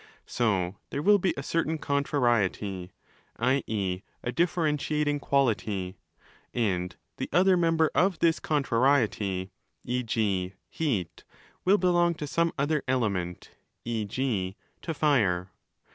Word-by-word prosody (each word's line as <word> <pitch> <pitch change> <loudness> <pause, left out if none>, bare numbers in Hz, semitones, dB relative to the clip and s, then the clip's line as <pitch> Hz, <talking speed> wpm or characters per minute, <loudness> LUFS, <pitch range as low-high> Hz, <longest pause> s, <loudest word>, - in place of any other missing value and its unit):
So 100 -6 0
there 140 - -3
will 205 +2 +6
be 185 0 +1
a 140 - -4
certain 160 +1 0
contrariety, 120 - 0 0.5
i.e. 110 -7 0 0.2
a 120 - -2
differentiating 150 -3 0
quality:? 105 -9 0 0.6
and 90 -6 0 0.2
the - - -4
other 185 +1 +5
member 165 -2 +2
of 185 -2 +2
this 165 0 +2
contrariety, 115 -9 +1 0.3
e.g. 110 -7 -1 0.2
heat, 115 - -2 0.4
will 195 +3 +5
belong 175 -2 +3
to 155 - -5
some 170 +3 +1
other 145 +1 +1
'element', 100 -9 -1 0.3
e.g. 110 -3 -2 0.3
to 165 - -3
Fire. 100 - +2
130 Hz, 110 wpm, -28 LUFS, 100-155 Hz, 0.6 s, will